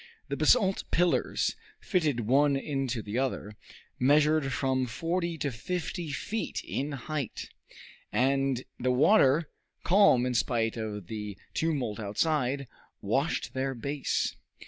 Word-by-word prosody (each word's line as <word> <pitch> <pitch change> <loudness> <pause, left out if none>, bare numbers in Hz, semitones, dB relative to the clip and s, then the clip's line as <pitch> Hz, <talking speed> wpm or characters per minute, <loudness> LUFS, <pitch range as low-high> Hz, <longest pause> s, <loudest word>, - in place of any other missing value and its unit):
The 140 - -1
basalt 190 - +3
pillars, 170 -7 +1 0.2
fitted 150 -9 0
one 140 +5 +3
into 135 -4 -2
the 105 +4 -2
other, 120 -5 -2 0.4
measured 150 +1 +3
from 130 -1 0
forty 170 +6 -2
to 145 -2 -2
fifty 170 +5 -4
feet 210 +9 -3
in 140 +3 -3
height, 140 -1 -4 0.6
and 135 -1 +1 0.2
the 125 +1 0
water, 145 +2 +4 0.3
calm 180 -10 +5
in 125 - -1
spite 115 -1 +1
of 105 -4 -5
the 105 0 -6 0.2
tumult 135 -10 -1
outside, 135 +5 0 0.3
washed - - -1
their 135 0 -2
base. 140 +4 -1
135 Hz, 120 wpm, -29 LUFS, 125-155 Hz, 0.6 s, calm